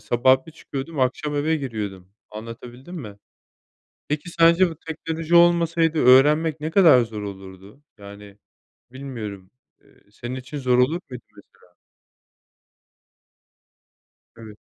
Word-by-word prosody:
sabah 130 +7 +2
bir 160 - -12
çıkıyordum, 145 -1 -7
akşam 140 +4 -1
eve 155 +3 0
giriyordum, 105 -9 -6 0.2
anlatabildim 120 +8 -10
mi? 110 - -8 0.9
Peki, 150 +4 -4
sence 170 +2 +4
bu 160 - -10
teknoloji 160 +1 -4
olmasaydı 170 -1 +3
öğrenmek 150 +4 +4
ne 155 - -4
kadar 165 -8 +6
zor 110 -2 -8
olurdu? 95 +4 -11 0.2
Yani, 100 0 -13 0.5
bilmiyorum, 110 -8 -8 0.3
eee, - - -27
senin 120 +4 -7
için 130 +3 -8
zor 125 -2 +1
olur 150 +8 +2
muydu - - -9
mesela? 475 0 -21 2.6
Evet 110 -2 -12
130 Hz, 115 wpm, -22 LUFS, 110-160 Hz, 2.6 s, kadar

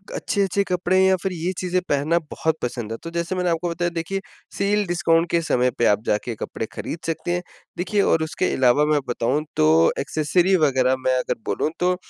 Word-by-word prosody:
अच्छे-अच्छे 200 0 0
कपड़े 180 +1 +1
या 190 0 +5
फिर 190 - -1
ये 175 +1 -2
चीज़ें 180 0 0
पहनना 145 +4 +2
बहुत 160 -1 -1
पसंद 120 -3 -4
है। 115 - -3
तो 165 - -5
जैसे 170 +2 -2
मैंने 180 -1 0
आपको 170 +1 -1
बताया 175 +1 -1
देखिए 195 +4 -2 0.4
सेल 205 +1 +1
डिस्काउंट 170 -1 +2
के 170 - +2
समय 125 -5 +1
पे 120 - +2
आप 105 +1 +2
जाके 110 +3 -1
कपड़े 110 - -5
खरीद 165 - -5
सकते 165 +1 -2
हैं। 175 0 -2 0.3
देखिए 200 +3 0
और 165 -4 +2
उसके 160 +3 -1
अलावा 130 +3 +4
मैं 150 - +3
बताऊँ 125 +5 0
तो 75 - +4 0.3
एक्सेसरी 160 +7 +2
वग़ैरह 130 -2 +2
मैं 130 - +3
अगर - - -2
बोलूँ 155 - -1
तो 180 +1 +2
165 Hz, 200 wpm, -22 LUFS, 135-180 Hz, 0.4 s, या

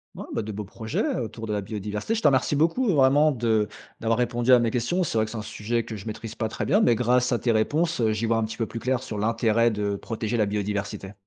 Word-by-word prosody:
Ouais, - - -7
bah, - - -2
de 110 - -5
beaux 105 +1 -5
projets, 110 +2 -3
autour 115 -1 -5
de 105 - -2
la 105 - -1
biodiversité. 105 - -4
Je 225 - -1
te - - +5
remercie 135 +1 +2
beaucoup, 165 - +2
vraiment, 145 +2 +5
de 110 -5 +1 0.3
d'avoir 115 +1 0
répondu 120 +1 +2
à 125 - +8
mes 120 -1 +1
questions. 125 +10 0
C'est 140 - -2
vrai 110 - +3
que 110 - -9
c'est 115 - -5
un - - -3
sujet 110 +2 -2
que 110 - -7
je 100 - -9
maîtrise 110 +1 -6
pas 110 -1 -2
très - - -4
bien, 205 - +4
mais 120 - +5
grâce 125 +1 +2
à 120 - +1
tes 120 - +1
réponses, 150 +9 +1
heu, 110 -2 +2
j'y 110 +2 -1
vois 115 0 +2
un 115 - +1
petit 110 - -5
peu 115 - -1
plus 115 - -6
clair, 130 +1 0
sur 110 -4 -6
l'intérêt 115 +1 +2
de 105 -1 -1
protéger 110 +2 -3
la 110 - +3
biodiversité. 100 -1 -3
115 Hz, 270 wpm, -25 LUFS, 110-125 Hz, 0.3 s, à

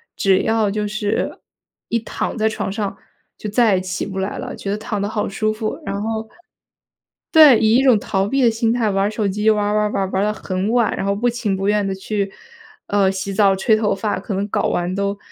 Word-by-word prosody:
只 190 -1 +3
要 220 -2 +1
就 210 0 -2
是 210 0 -2 0.5
一 230 - +1
躺 225 +2 -4
在 220 0 +2
床 220 - -3
上 200 -1 -3 0.4
就 210 - -5
再 220 -2 +3
也 185 - 0
起 185 +1 -3
不 195 -1 -7
来 190 +2 -3
了， - - -6
觉 195 - -5
得 205 - -1
躺 215 -1 -4
得 200 - -1
好 215 -1 -2
舒 215 +2 -1
服。 215 0 -3
然 200 +1 -3
后 220 0 -3 1.0
对， 300 -8 +8
以 220 +1 +3
一 265 - +3
种 250 -6 +5
逃 195 0 -1
避 270 +5 0
的 235 - +6
心 225 0 0
态 230 -3 +1
玩 195 0 +1
儿 210 - -1
手 215 -1 -1
机， 210 +3 +1
玩 210 -1 +2
儿 205 - 0
玩 210 - +2
儿 210 - -1
玩 195 - 0
儿， 190 - -3
玩 190 +1 +1
儿 - - +2
得 210 - 0
很 190 0 -3
晚， 235 -3 +2
然 195 - -2
后 200 - +1
不 240 +4 +1
情 225 -5 -1
不 195 +1 -2
愿 210 -1 +2
地 195 - -1
去， 195 0 -3 0.6
呃， 200 -2 +2
洗 195 +1 -4
澡 195 -1 +4
吹 215 +3 +3
头 215 -2 +1
发， 205 0 -2
可 200 +2 -5
能 195 +2 -1
搞 - - 0
完 175 +1 -1
都 200 0 -1
210 Hz, 265 characters per minute, -20 LUFS, 195-220 Hz, 1.0 s, 对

